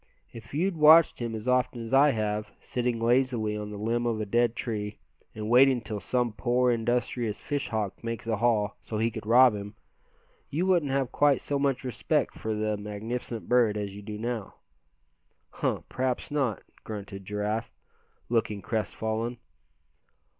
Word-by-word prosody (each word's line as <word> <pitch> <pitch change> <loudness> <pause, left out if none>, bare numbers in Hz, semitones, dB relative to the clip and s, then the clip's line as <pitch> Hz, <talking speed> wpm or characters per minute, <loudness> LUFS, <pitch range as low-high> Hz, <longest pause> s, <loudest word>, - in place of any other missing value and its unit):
If 115 -1 -11
you'd 180 +3 0
watched 155 +2 +7
him 115 -2 -3
as 110 +2 -6
often 125 -1 +1
as 115 +3 -7
I 140 +2 +7
have, 105 -3 -2
sitting 125 -1 -2
lazily 120 -2 +1
on 105 0 -5
the 105 - -7
limb 115 +3 0
of 115 -2 -1
a 110 - -2
dead 120 +2 +2
tree, 105 -4 -4 0.4
and 105 0 -4
waiting 130 +2 +6
till 110 -2 -5
some 120 +1 -1
poor, 125 +2 +2
industrious 120 -1 -1
fish 145 -1 -3
hawk 105 -2 -3
makes 115 -1 -4
a 115 -2 0
haul, 110 -3 +1
so 110 - -5
he 115 +2 +1
could 105 - -7
rob 125 +1 +7
him, 105 0 -6 0.7
you 165 +6 0
wouldn't 175 -7 +2
have 135 -2 0
quite 145 -1 +3
so 140 -1 -2
much 140 -2 0
respect 125 -3 0
for 110 -1 -3
the 105 0 -1
magnificent 110 +3 -5
bird 120 -4 +3
as 100 -1 -4
you 100 - -8
do 105 +1 -6
now." 115 -2 -4 1.0
"Huh! - - -1
p'raps 130 +2 -2
not," 135 -8 0 0.2
grunted 100 -2 -7
Giraffe, 105 +3 -2 0.6
looking 110 -4 0
crestfallen. 110 +1 -2
115 Hz, 165 wpm, -28 LUFS, 105-125 Hz, 1.0 s, watched